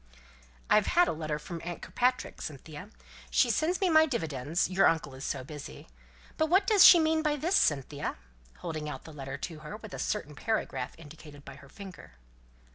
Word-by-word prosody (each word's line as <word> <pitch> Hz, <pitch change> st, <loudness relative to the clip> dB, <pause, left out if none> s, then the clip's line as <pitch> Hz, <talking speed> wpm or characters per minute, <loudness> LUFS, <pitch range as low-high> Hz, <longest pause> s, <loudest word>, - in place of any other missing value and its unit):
"I've 210 Hz, -1 st, +4 dB
had 355 Hz, 0 st, +4 dB
a -, -, +1 dB
letter 155 Hz, -1 st, -3 dB
from 165 Hz, +2 st, -8 dB
aunt 175 Hz, 0 st, -6 dB
Kirkpatrick, 250 Hz, +1 st, -1 dB
Cynthia. 155 Hz, +5 st, -8 dB, 0.4 s
She 245 Hz, -, +3 dB
sends 320 Hz, -, 0 dB
me 385 Hz, -, +2 dB
my 315 Hz, -2 st, +5 dB
dividends, 160 Hz, -, -1 dB
your 190 Hz, +1 st, +4 dB
uncle 160 Hz, -4 st, 0 dB
is 130 Hz, +1 st, -9 dB
so -, -, -3 dB
busy. 145 Hz, -, -10 dB, 0.5 s
But 315 Hz, -, +2 dB
what 380 Hz, +4 st, +4 dB
does 405 Hz, -1 st, +6 dB
she 345 Hz, -, +10 dB
mean 315 Hz, 0 st, +2 dB
by 300 Hz, -2 st, +1 dB
this, 335 Hz, +7 st, 0 dB
Cynthia?" 145 Hz, -, 0 dB, 0.5 s
(holding 155 Hz, -3 st, -4 dB
out 130 Hz, -3 st, -7 dB
the 160 Hz, -, -11 dB
letter 135 Hz, -2 st, -6 dB
to 160 Hz, -3 st, -6 dB
her, 150 Hz, +7 st, -8 dB
with 220 Hz, -3 st, -11 dB
a -, -, -6 dB
certain 155 Hz, -8 st, -3 dB
paragraph 220 Hz, +9 st, -3 dB
indicated 150 Hz, -2 st, -13 dB
by 140 Hz, -, -9 dB
her 140 Hz, -1 st, -16 dB
finger). 190 Hz, -, -11 dB
165 Hz, 190 wpm, -29 LUFS, -, 0.5 s, she